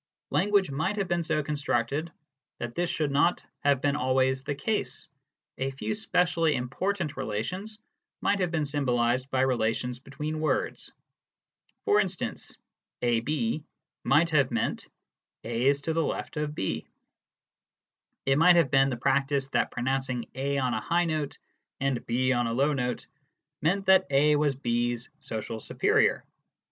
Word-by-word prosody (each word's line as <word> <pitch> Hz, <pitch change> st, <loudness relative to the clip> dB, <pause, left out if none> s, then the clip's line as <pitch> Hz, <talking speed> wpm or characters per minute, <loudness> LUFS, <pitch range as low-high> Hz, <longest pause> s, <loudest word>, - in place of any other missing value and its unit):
Language 200 Hz, -5 st, +2 dB
might 160 Hz, +9 st, -1 dB
have 195 Hz, -2 st, 0 dB
been 175 Hz, 0 st, +1 dB
so 155 Hz, -2 st, 0 dB
con 150 Hz, -, -3 dB
structed 145 Hz, +2 st, -1 dB, 0.5 s
that 120 Hz, 0 st, -5 dB
this 175 Hz, +3 st, -1 dB
should 150 Hz, -3 st, -1 dB
not 145 Hz, +5 st, +2 dB
have 140 Hz, -2 st, +2 dB
been 145 Hz, 0 st, +1 dB
always 130 Hz, 0 st, +1 dB
the 145 Hz, -, -3 dB
case: 210 Hz, +10 st, -2 dB, 0.5 s
a 135 Hz, +1 st, 0 dB
few 135 Hz, +9 st, -3 dB
specially 175 Hz, -7 st, +1 dB
important 155 Hz, +7 st, -2 dB
relations 185 Hz, -, -4 dB, 0.4 s
might 200 Hz, -, +1 dB
have 180 Hz, -2 st, +1 dB
been 160 Hz, -3 st, 0 dB
symbolised 130 Hz, -3 st, 0 dB
by 130 Hz, -1 st, +1 dB
relations 125 Hz, -1 st, 0 dB
between 150 Hz, +4 st, -5 dB
words. 155 Hz, -, -1 dB, 0.9 s
For 420 Hz, -1 st, +4 dB
instance, -, -, -3 dB, 0.5 s
"AB" 120 Hz, +3 st, 0 dB, 0.4 s
might 155 Hz, +6 st, +3 dB
have 140 Hz, -4 st, +3 dB
meant 115 Hz, -, -2 dB, 0.6 s
"A 120 Hz, +3 st, 0 dB
is 140 Hz, 0 st, +3 dB
to 160 Hz, +3 st, -1 dB
the 165 Hz, -, +1 dB
left -, -, -3 dB
of 150 Hz, 0 st, -2 dB
B." 95 Hz, -, -2 dB, 1.4 s
It 135 Hz, +1 st, +3 dB
might 175 Hz, +2 st, +7 dB
have 165 Hz, -6 st, +3 dB
been 135 Hz, -1 st, +5 dB
the 125 Hz, -, -3 dB
practice 135 Hz, +1 st, +1 dB
that -, -, +1 dB
pronouncing 130 Hz, -1 st, -2 dB
A 140 Hz, +2 st, -1 dB
on 130 Hz, -2 st, +1 dB
a -, -, -1 dB
high 175 Hz, +1 st, +1 dB
note 155 Hz, -3 st, -2 dB, 0.4 s
and 135 Hz, -3 st, 0 dB
B 130 Hz, +2 st, +1 dB
on 120 Hz, -1 st, +1 dB
a 115 Hz, -, -1 dB
low 140 Hz, +5 st, +2 dB
note 125 Hz, -3 st, -2 dB, 0.6 s
meant 195 Hz, +6 st, +1 dB
that 190 Hz, -1 st, +5 dB
A 145 Hz, +2 st, +4 dB
was 145 Hz, -2 st, +2 dB
B's 120 Hz, -2 st, -1 dB
social 110 Hz, 0 st, -5 dB
superior. -, -, +2 dB
140 Hz, 155 wpm, -28 LUFS, 125-160 Hz, 1.4 s, might